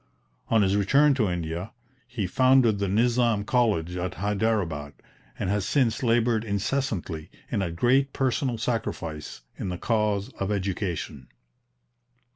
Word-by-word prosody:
On 110 -2 +4
his 95 +1 +2
return 140 +9 +4
to 115 -7 +1
India 85 +3 -4 0.3
he 120 -5 -3
founded 125 +1 +4
the 100 - 0
Nizam 115 +1 +2
College 105 -9 +1
at 90 +1 -3
Hyderabad, 100 -8 -1 0.4
and 95 - -2
has 100 -1 0
since 115 +1 +1
laboured 115 -2 +2
incessantly, 100 - -2 0.2
and - - 0
at 85 -3 -3
great 135 +8 +3
personal 130 -2 0
sacrifice, 95 - -4 0.2
in - - -3
the 90 - -3
cause 105 -1 0
of 100 +1 -1
education. 90 - -3
105 Hz, 130 wpm, -26 LUFS, 90-120 Hz, 0.4 s, On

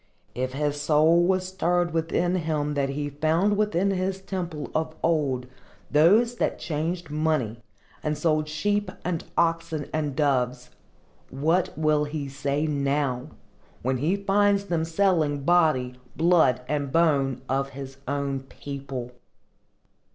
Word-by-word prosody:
If 130 +1 -3
his 145 +1 -1
soul 155 +3 +4
was 185 +1 +1
stirred 175 -2 0
within 165 +2 0
him 155 -4 -1
when 140 -1 0
he 145 +1 -3
found 160 +8 +2
within 200 -2 +1
his 190 0 -1
temple 175 -6 -5
of 160 0 -1
old 145 -6 +1 0.5
those 210 +11 +4
that - - 0
changed 165 +1 -3
money, 150 -7 0 0.4
and 150 -1 -1
sold 155 -1 +1
sheep 205 +6 0 0.2
and 175 -2 -1
oxen 165 -3 0
and 150 -3 -1
doves, 125 -4 0 0.6
what 160 +7 0
will 155 -1 +2
he 145 -1 -4
say 140 +2 -1
now, 140 -3 0 0.6
when 130 +1 +1
he 155 +9 +1
finds 200 0 +2
them 170 -4 0
selling 160 -5 +1
body, 155 -7 +3 0.2
blood 160 -7 +4
and 145 -2 -2
bones, 140 -6 +2
of 135 +1 0
his 135 0 -8
own 140 -1 -1
people? 135 -2 -7
155 Hz, 130 wpm, -26 LUFS, 140-175 Hz, 0.6 s, soul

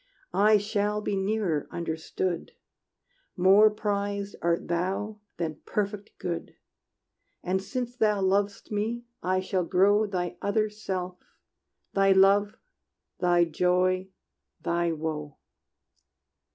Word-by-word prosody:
I 210 +1 +5
shall 210 0 0
be 205 -1 -2
nearer, 195 -6 0
understood: 170 +1 -3 0.8
More 195 +4 +7
prized 205 -1 -2
art 170 0 0
thou 190 +5 -2 0.2
than 160 -3 -3
perfect 205 0 -3
good. 170 -2 -4 0.9
And 190 +1 0
since 245 +4 -4
thou 210 -4 +2
lov'st 200 +3 0
me, 225 +3 -2 0.2
I 185 +1 +1
shall 185 -1 -1
grow 205 +5 +3
Thy 180 -3 -3
other 215 +1 +1
self 185 -4 -4 0.8
thy 195 0 +4
Life, 200 +2 +4 0.6
thy 175 -1 +4
Joy, 180 +3 +1 0.5
thy 170 0 0
Woe! 155 -2 -4
195 Hz, 105 wpm, -27 LUFS, 180-210 Hz, 0.9 s, More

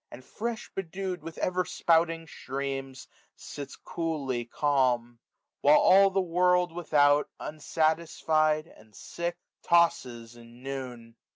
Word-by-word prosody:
And 130 +1 -12
fresh 230 0 -5
bedew'd 185 0 -4
with 165 -1 -9
eyer 180 0 0
spouting 165 -1 +1
streams^ 135 -2 -5 0.3
Sitsxoolly 140 -3 -5
calm 125 -5 0 0.2
} - - -59
while 145 +2 +6
all 195 +1 +6
the 195 0 0
world 180 0 +2
without. 150 -4 +2
Unsatisfied, 155 0 0
and 110 -9 -20
sick, 170 0 -5 0.2
tosses 125 -9 +1
in 120 +1 -16
noon. 125 -4 -7
155 Hz, 110 wpm, -28 LUFS, 130-170 Hz, 0.3 s, while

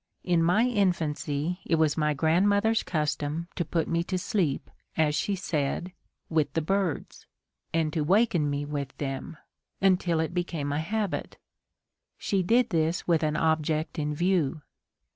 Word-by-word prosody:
In 175 -2 +2
my 180 +7 +4
infancy 170 - 0
it 165 - +1
was 155 -2 +2
my 150 -1 +1
grandmother's 200 +9 +3
custom 150 +1 -2
to 175 - 0
put 165 0 -1
me 170 0 0
to 185 - -1
sleep, 180 - -1 0.3
as 155 -2 +3
she 200 +6 0
said, 175 0 -2 0.3
with 155 -3 +1
the 165 - +1
birds, 195 -1 -2 0.4
and 160 -2 0
to 160 - 0
waken 180 -3 +3
me 145 0 -2
with 145 -2 -5
them, 135 +3 -4 0.4
until 180 -3 +2
it 160 +2 -1
became 170 -5 -2
a 145 - 0
habit. 205 +4 -2 0.8
She 195 -2 0
did 235 +6 +3
this 165 0 0
with 165 -2 +3
an 155 -1 0
object 160 0 0
in 150 0 -1
view. 165 -4 +1
165 Hz, 150 wpm, -27 LUFS, 150-185 Hz, 0.8 s, my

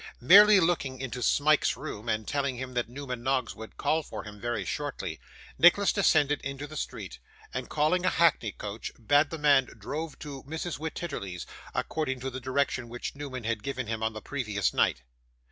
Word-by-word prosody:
Merely 205 +10 +8
looking 165 -7 0
into 130 -1 -5
Smike's 150 +4 +3
room, 120 -5 -6
and 110 -1 -1
telling 140 -3 -1
him 130 0 -6
that 120 -1 -1
Newman 125 -2 -6
Noggs 130 +1 0
would 110 0 -11
call 160 +1 +1
for - - -7
him 105 -1 -11
very 120 +1 -2
shortly, 145 -2 -4 0.4
Nicholas 185 +4 +6
descended 150 -7 +3
into 140 +1 -5
the 155 +1 -10
street, 60 - -5 0.3
and 130 0 -4
calling 155 +4 +2
a 185 - +4
hackney 160 -10 +3
coach, 105 +2 -6
bade 145 +6 +3
the 165 - -5
man 145 -3 +5
drive 155 +1 -5
to 140 -3 -8
Mrs. 160 +2 -4
Wititterly's, 145 - -5 0.3
according 130 -5 -1
to 135 +1 -3
the 130 +1 -6
direction 130 -1 -1
which 120 +1 -5
Newman 140 -4 -6
had 115 -1 -1
given 130 +1 -3
him 110 0 -3
on 110 0 0
the 110 - -8
previous 105 -9 -1
night. - - +2
135 Hz, 180 wpm, -28 LUFS, 120-155 Hz, 0.4 s, Merely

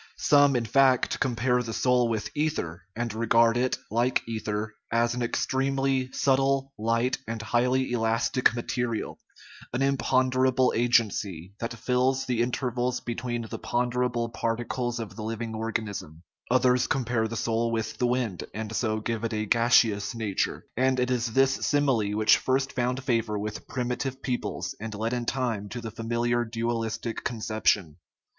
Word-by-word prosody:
Some, 145 -2 +5
in 120 -2 +1
fact, 130 +2 +3
compare 125 -1 +1
the 115 -2 -5
soul 125 -2 +3
with 110 -2 -2
ether, 120 - -2
and 120 -1 -2
regard 115 +1 +3
it, 125 +1 +1
like 120 +3 +1
ether, 110 -1 -3 0.2
as 115 +1 +2
an 125 - -3
ex 120 - 0
tremely 135 -1 0
subtle, 135 0 +1
light, 115 +3 0
and 115 0 -3
highly 125 +4 +1
elastic 115 +1 +2
material, 120 -1 -3 0.5
an 125 +2 +1
imponderable 130 -1 +2
agency, 105 -7 +1
that 115 0 -4
fills 130 +3 +1
the 125 -3 0
intervals 125 0 -1
between 120 0 -3
the 110 - -7
ponderable 120 -1 0
particles 120 +1 -2
of 110 -3 -6
the 110 - -7
living 115 +1 -4
organism, 110 -7 -4 0.3
others 125 0 +3
compare 120 -3 0
the 115 +1 -5
soul 115 +1 0
with 115 -1 -3
the 125 - +2
wind, 120 -7 -1
and 110 0 -4
so 110 -2 0
give 115 0 -3
it 115 0 -2
a 110 0 -1
gas 120 +3 +5
eous 105 -1 -3
nature; 105 -4 -2
and 130 +1 +2
it 125 0 +1
is 120 -2 0
this 135 +1 +4 0.2
simile 130 -8 +2
which 110 0 +5
first 135 +1 0
found 125 +1 -1
favor 115 -5 0
with 105 +1 -5
primitive 130 +1 -3
peoples, 125 -2 -3
and 110 0 -5
led 110 +3 -2
in 120 -1 -2
time 115 -6 -1
to 125 - -5
the 115 -1 -6
fa 115 - -9
miliar 120 +1 +1
dualistic 115 0 -3
conception. 110 -7 0
120 Hz, 160 wpm, -27 LUFS, 110-125 Hz, 0.5 s, Some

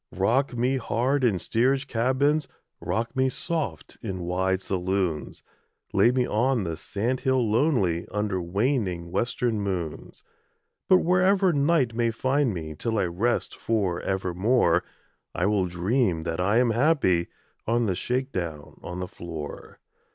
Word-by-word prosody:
Rock 120 +7 +1
me 125 +3 +1
hard 130 +3 0
in 110 -6 +3
steerage 130 +9 +1
cabins, 135 +4 +1 0.3
Rock 115 +4 -2
me 130 0 +2
soft 140 - -4
in 95 -2 -4
wide 95 +2 0
saloons, 95 -4 -2 0.5
Lay - - +5
me 125 0 +1
on 120 +1 +1
the 85 -3 -3
sand 110 +10 -2
hill 130 -3 +1
lonely 105 - +1
Under 105 -3 -1
waning 90 -2 -1
western 115 +2 0
moons; 90 -6 -4 0.7
But 185 -1 +6
wherever 185 +1 +3
night 140 -4 +2
may 115 0 +1
find 130 +3 +1
me 80 -4 -5
Till 110 +8 -2
I 100 - +2
rest 95 +8 -1
for 100 -6 -1
evermore 95 0 +1 0.5
I 90 - 0
will 100 -2 +2
dream 90 0 0
that 85 0 -3
I 100 +5 +2
am 120 -1 +3
happy 115 - +2 0.4
On 120 +1 +2
the 95 - +1
shake 130 +8 -2
down 80 -5 -5
on 90 +1 -6
the 90 - -3
floor. 80 -5 -8
110 Hz, 145 wpm, -26 LUFS, 90-130 Hz, 0.7 s, But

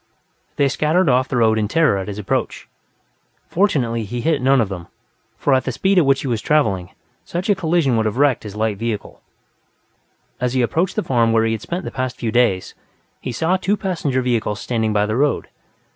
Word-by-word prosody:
They 140 - +3
scattered 155 +5 +1
off 125 0 +3
the 125 - -2
road 110 -1 +3
in 105 - 0
terror 155 -6 +2
at 95 - -5
his 100 -1 -5
approach; 105 - -2 0.8
fortunately, 130 - +1
he 120 +4 -4
hit 155 0 +1
none 135 +1 +4
of 115 - +2
them, 90 -3 -7 0.5
for 140 - +1
at 130 - +3
the 130 - -2
speed 190 +9 +2
at 155 - +2
which 135 -1 +3
he - - -4
was 115 -4 -1
traveling, 100 -13 +1 0.3
such 180 +4 -2
a - - +6
collision 165 - +1
would 110 -1 +1
have 110 - -3
wrecked 140 -3 +3
his 105 -2 -9
light 110 -1 -1
vehicle. 115 -3 -4 1.2
As 125 0 -1
he 130 - +3
approached 170 +9 0
the 215 - 0
farm 115 -3 +2
where 115 0 +3
he 115 - +1
had 110 -2 -3
spent 175 - -4
the - - -5
past 130 -1 -3
few 115 -2 -2
days, 110 -6 +1 0.5
he 130 - -5
saw 165 +9 +1
two 200 +3 0
passenger 160 -10 -1
vehicles 115 -4 -1
standing 110 -3 -1
by 105 -1 +2
the 110 +1 -2
road. 145 +3 0
125 Hz, 210 wpm, -20 LUFS, 110-150 Hz, 1.2 s, a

